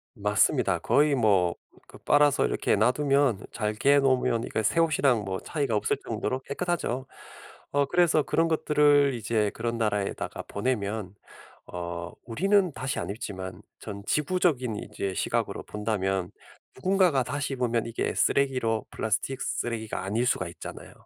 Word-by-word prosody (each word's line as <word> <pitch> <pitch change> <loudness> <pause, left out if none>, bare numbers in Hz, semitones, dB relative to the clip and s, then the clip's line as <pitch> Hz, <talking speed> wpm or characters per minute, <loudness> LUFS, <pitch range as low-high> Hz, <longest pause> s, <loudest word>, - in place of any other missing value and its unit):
맞습니다. 105 -1 +2
거의 145 0 +3
뭐 100 -8 +3 0.3
그 - - -14
빨아서 145 -1 +3
이렇게 - - +1
놔 125 - +4
두면 140 -5 +1
잘 105 -2 -2
개 140 +6 +4
놓으면 125 -3 +2
이게 110 - -2
새 165 - +2
옷이랑 140 -8 +3
뭐 95 -1 -3
차이가 140 -7 -2
없을 105 - +1
정도로 130 - -2
깨끗하죠. 140 -3 -2 0.7
어 145 0 +2
그래서 170 -3 +3
그런 165 0 +1
것들을 145 -3 +3
이제 110 -2 0
그런 115 +1 -3
나라에다가 105 -3 -2
보내면 105 -4 -2 0.5
어 85 0 -5
우리는 185 - +2
다시 135 +2 -3
안 - - -4
입지만 95 -3 -6 0.2
전 100 -2 -8
지구적인 150 -7 +1
이제 100 -2 -4
시각으로 - - -1
본다면 95 -4 -2 0.4
누군가가 180 -2 +2
다시 145 +2 -3
입으면 120 -3 0
이게 115 0 -2
쓰레기로 130 -5 +1
플라스틱 130 +4 -2
쓰레기가 110 -4 -3
아닐 110 +6 0
수가 90 -8 0
있잖아요. 85 - -9
120 Hz, 335 characters per minute, -27 LUFS, 105-145 Hz, 0.7 s, 놔